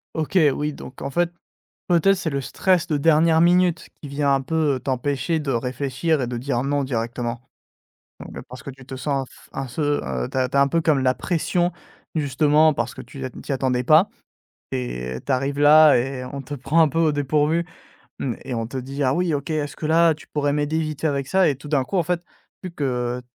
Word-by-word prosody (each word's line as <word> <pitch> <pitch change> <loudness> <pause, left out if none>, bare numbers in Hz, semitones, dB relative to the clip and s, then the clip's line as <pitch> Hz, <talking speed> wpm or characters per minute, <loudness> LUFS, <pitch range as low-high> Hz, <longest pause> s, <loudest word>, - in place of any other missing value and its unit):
OK 160 +4 +1
oui, 150 +2 -2
donc 135 -2 -11
en - - -3
fait, 175 +5 +1 0.6
peut-être 180 +3 +4
c'est 170 -4 -3
le 140 - -1
stress 175 +6 +1
de 155 - +1
dernière 160 +2 +4
minute 175 0 +3 0.2
qui 145 - -7
vient 140 0 +1
un 135 - +1
peu, 155 0 0
heu, 130 - -4
t'empêcher 140 +4 -1
de 150 -3 -2
réfléchir 130 +5 -1
et 125 - -1
de 120 0 -4
dire 125 0 -1
«Non» 145 +1 0
directement? 120 -1 -3 0.8
Donc, - - -9
parce 125 - -10
que 140 - -6
tu 135 0 -15
te 130 - -7
sens 135 0 -2
fe - - -18
un 135 0 -4
feu, 145 +3 -1
heu, 65 -3 -3
tu - - -9
as 130 -1 +1
tu 140 - -1
as 140 - +6
un 140 - +4
peu 165 +4 +1
comme 150 -4 +2
la 130 0 +3
pression 175 +3 0 0.4
justement 150 +1 +3
parce 120 -4 -3
que - - -7
tu, 125 +3 -12
heu, - - -2
n - - -11
t'y - - -5
attendais 125 -2 0
pas 155 +9 +5 0.6
et 60 0 -4
tu - - -4
arrives 135 +2 -1
là 150 +1 +8
et 125 +1 -3
on 140 +2 -6
te 135 +2 -7
prend 145 +5 +1
un 160 - +6
peu 165 - -3
au 155 -2 +3
dépourvu. 150 +4 +1 0.5
Mmh 125 -4 -2
et 135 - -6
on 115 -1 -2
te 125 - -8
dit: 135 +2 -4
«Ah 130 -1 +2
oui, 180 0 0
OK, 140 -1 -2
est-ce 150 -2 -2
que 155 - -4
là 165 +1 +5
tu 155 - -16
pourrais 145 -1 0
m'aider 150 +2 0
vite 155 -2 -4
fait 160 - 0
avec 140 -2 -1
ça?» 190 +2 +3
et 140 - 0
tout 145 +1 -11
d'un 145 -3 +1
coup 195 - -3
en 180 - +3
fait, 175 +2 -1 0.4
vu 185 - -5
que 125 -4 -2
145 Hz, 235 wpm, -22 LUFS, 130-160 Hz, 0.8 s, là